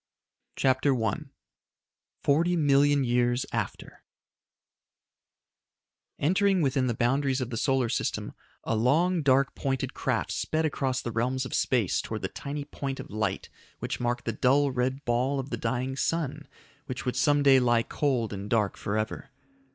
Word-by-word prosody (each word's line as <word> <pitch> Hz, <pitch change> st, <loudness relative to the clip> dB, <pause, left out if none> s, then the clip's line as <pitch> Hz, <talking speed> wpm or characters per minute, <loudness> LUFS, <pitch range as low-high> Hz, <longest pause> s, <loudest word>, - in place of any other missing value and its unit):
CHAPTER 130 Hz, +1 st, +2 dB
I 110 Hz, -4 st, 0 dB, 1.1 s
40,000,000 145 Hz, -3 st, +3 dB
Years 120 Hz, +1 st, +1 dB
After -, -, -5 dB, 2.1 s
Entering 190 Hz, +4 st, +2 dB
within 135 Hz, -2 st, +1 dB
the 120 Hz, -, -1 dB
boundaries 135 Hz, +3 st, +1 dB
of 125 Hz, -1 st, -4 dB
the -, -, -3 dB
solar 130 Hz, +1 st, +1 dB
system, 115 Hz, -, -2 dB, 0.3 s
a 115 Hz, -, -1 dB
long, 160 Hz, +10 st, +2 dB
dark, 135 Hz, -1 st, +3 dB
pointed 135 Hz, -2 st, -2 dB
craft -, -, -1 dB
sped 160 Hz, +1 st, -1 dB
across 135 Hz, -4 st, -1 dB
the 120 Hz, -, -3 dB
realms 125 Hz, +3 st, -1 dB
of -, -, -7 dB
space 120 Hz, -8 st, +1 dB
towards -, -, -6 dB
the -, -, -1 dB
tiny 140 Hz, 0 st, -5 dB
point 135 Hz, -2 st, -5 dB
of -, -, -8 dB
light 105 Hz, -2 st, -2 dB, 0.3 s
which -, -, -4 dB
marked 120 Hz, 0 st, -1 dB
the 115 Hz, -, -1 dB
dull 135 Hz, +5 st, +3 dB
red 130 Hz, +2 st, -2 dB
ball 125 Hz, +4 st, +1 dB
of 135 Hz, +1 st, -6 dB
the -, -, 0 dB
dying 130 Hz, +1 st, -2 dB
sun 150 Hz, -1 st, -2 dB, 0.4 s
which 130 Hz, +1 st, -5 dB
would 125 Hz, -, -1 dB
some 145 Hz, -1 st, +3 dB
day 135 Hz, -2 st, +7 dB
lie 120 Hz, -2 st, +3 dB
cold 125 Hz, -7 st, -1 dB
and 100 Hz, +1 st, -6 dB
dark 105 Hz, -3 st, +1 dB
forever. 110 Hz, +4 st, -3 dB
130 Hz, 150 wpm, -28 LUFS, 120-140 Hz, 2.1 s, day